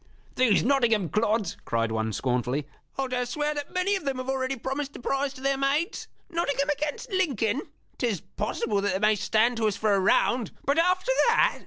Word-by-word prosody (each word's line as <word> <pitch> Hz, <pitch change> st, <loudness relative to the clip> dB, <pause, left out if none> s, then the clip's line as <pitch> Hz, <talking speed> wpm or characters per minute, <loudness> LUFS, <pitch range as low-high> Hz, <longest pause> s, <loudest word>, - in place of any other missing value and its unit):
"These 240 Hz, -6 st, +3 dB
Nottingham 230 Hz, -, +2 dB
clods!" 215 Hz, -3 st, 0 dB
cried 115 Hz, 0 st, -1 dB
one, 110 Hz, 0 st, -1 dB
scornfully; 125 Hz, +4 st, -1 dB, 0.3 s
"I'll 270 Hz, -1 st, 0 dB
dare 250 Hz, -1 st, -1 dB
swear 295 Hz, +3 st, -1 dB
that 290 Hz, -1 st, -5 dB
many 370 Hz, +2 st, +1 dB
of 380 Hz, -, -4 dB
them 275 Hz, -2 st, -2 dB
have 255 Hz, +1 st, -5 dB
already 265 Hz, 0 st, -1 dB
promised 270 Hz, +3 st, -4 dB
the -, -, -9 dB
prize 275 Hz, +2 st, -1 dB
to 260 Hz, -, -12 dB
their 275 Hz, 0 st, +1 dB
maids! 285 Hz, +5 st, 0 dB, 0.2 s
Nottingham 285 Hz, -5 st, -1 dB
'gainst 300 Hz, -, -4 dB
Lincoln 275 Hz, -, +1 dB, 0.4 s
'tis 230 Hz, -8 st, 0 dB
possible 210 Hz, +2 st, -2 dB
that 205 Hz, -, 0 dB
they 190 Hz, -, -1 dB
may 215 Hz, +1 st, +4 dB
stand 220 Hz, +3 st, +2 dB
to 220 Hz, -1 st, +2 dB
us 210 Hz, -, -1 dB
for 215 Hz, -1 st, +2 dB
a 195 Hz, -, +3 dB
round. 225 Hz, +4 st, +2 dB, 0.2 s
But 280 Hz, +4 st, +2 dB
after 365 Hz, +7 st, +2 dB, 0.2 s
that!" -, -, +3 dB
255 Hz, 195 wpm, -27 LUFS, 210-285 Hz, 0.4 s, may